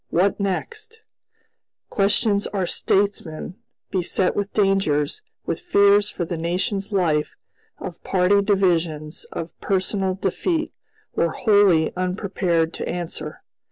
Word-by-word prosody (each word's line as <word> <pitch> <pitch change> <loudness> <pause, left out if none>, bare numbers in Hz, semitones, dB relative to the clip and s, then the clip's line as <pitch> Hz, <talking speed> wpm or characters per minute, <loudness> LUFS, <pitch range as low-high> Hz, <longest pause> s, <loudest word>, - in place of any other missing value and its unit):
"What 190 +5 +2
next?" 430 - -3 0.9
Questions 200 +1 +2
our 195 -3 -1
statesmen, 185 -4 -1 0.4
beset 185 0 0
with 205 0 -2
dangers, 195 - +1 0.2
with - - -2
fears 205 - +4
for 175 - -3
the 170 0 -4
nation's 185 +5 -2
life, 165 -6 +1 0.4
of 175 -3 -8
party 195 +2 +3
divisions, 170 -6 0
of 165 0 -6
personal 190 -1 0
defeat, 315 - -1 0.4
were 170 - +2
wholly 200 -5 +3
unprepared 180 -3 0
to - - -4
answer. 160 -3 -5
190 Hz, 110 wpm, -23 LUFS, 170-200 Hz, 0.9 s, fears